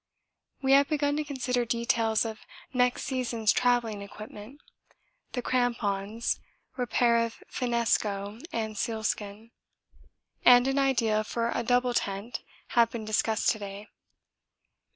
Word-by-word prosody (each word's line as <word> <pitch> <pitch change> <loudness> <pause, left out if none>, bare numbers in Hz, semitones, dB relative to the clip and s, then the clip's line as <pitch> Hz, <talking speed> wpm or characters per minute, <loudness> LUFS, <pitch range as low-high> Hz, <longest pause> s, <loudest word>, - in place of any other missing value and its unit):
We 265 - +2
have 280 +1 +6
begun 290 -1 +1
to 305 - 0
consider 255 -4 -1
details 230 -1 +1
of 220 -1 -5 0.3
next 250 -1 +2
season's 235 -5 0
travelling 240 -4 +1
equipment. 210 +5 -10 0.7
The 245 - -2
crampons, 225 -4 0 0.4
repair 240 -2 +2
of 230 -1 -6
finnesko 220 -3 0
with 220 -2 -3
sealskin, 220 -1 -3 0.9
and 245 +1 +7
an 270 +1 +1
idea 230 -6 +2
for 230 +2 -2
a - - 0
double 245 +1 +2
tent 200 +2 -2 0.3
have 235 -1 +4
been 230 -3 -6
discussed 215 0 +1
to 220 - 0
day. 200 +1 -8
235 Hz, 120 wpm, -28 LUFS, 215-250 Hz, 0.9 s, and